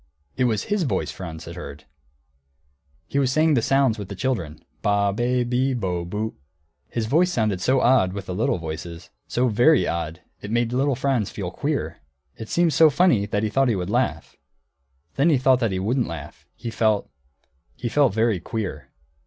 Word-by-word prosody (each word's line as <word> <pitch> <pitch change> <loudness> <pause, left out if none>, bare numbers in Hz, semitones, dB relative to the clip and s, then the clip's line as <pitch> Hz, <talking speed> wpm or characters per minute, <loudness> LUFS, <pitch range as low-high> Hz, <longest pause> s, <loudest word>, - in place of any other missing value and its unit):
It 130 - +1
was 110 -4 0
his 205 -1 -1
voice 155 - -1
Franz 85 -3 -8
had 85 - -8
heard. 75 -4 -9 1.2
He 140 - -1
was 130 -2 +2
saying 155 +3 +3
the 125 - +3
sounds 135 -3 +2
with 100 - -6
the 100 - -7
little - - -9
children, 80 -6 -9 0.2
ba, 100 -1 +2
be, 120 +3 +1
bi, 125 +2 0
bo, 90 -4 -2
bu. 105 +5 -3 0.5
His 115 -2 -2
voice 165 +10 +3
sounded 110 - 0
so 130 +5 +2
odd, 120 -8 +4
with 100 0 -6
the 90 - -5
little 95 0 0
voices, 85 0 -7 0.2
so 125 +1 +1
very 120 +6 +4
odd, 85 0 -3 0.2
it 100 - -7
made 120 +1 0
little 135 +1 +1
Franz 125 -5 0
feel 90 -4 -5
queer. 145 +8 -3 0.4
It 110 - -9
seemed 170 -2 +2
so 160 -1 +6
funny 145 - +3
that 105 +1 -1
he 110 - 0
thought 135 +2 +2
he 115 - +2
would 90 +1 -3
laugh; 120 -10 -1 0.8
then 140 +5 +4
he 150 - +4
thought 130 0 +3
he 95 - -1
wouldn't 115 +7 0
laugh, - - -9
he 115 - -6
felt 110 -2 +1 0.7
he - - -4
felt 135 -3 +2
very 110 -3 +2
queer. 85 -8 -5
115 Hz, 190 wpm, -23 LUFS, 95-130 Hz, 1.2 s, so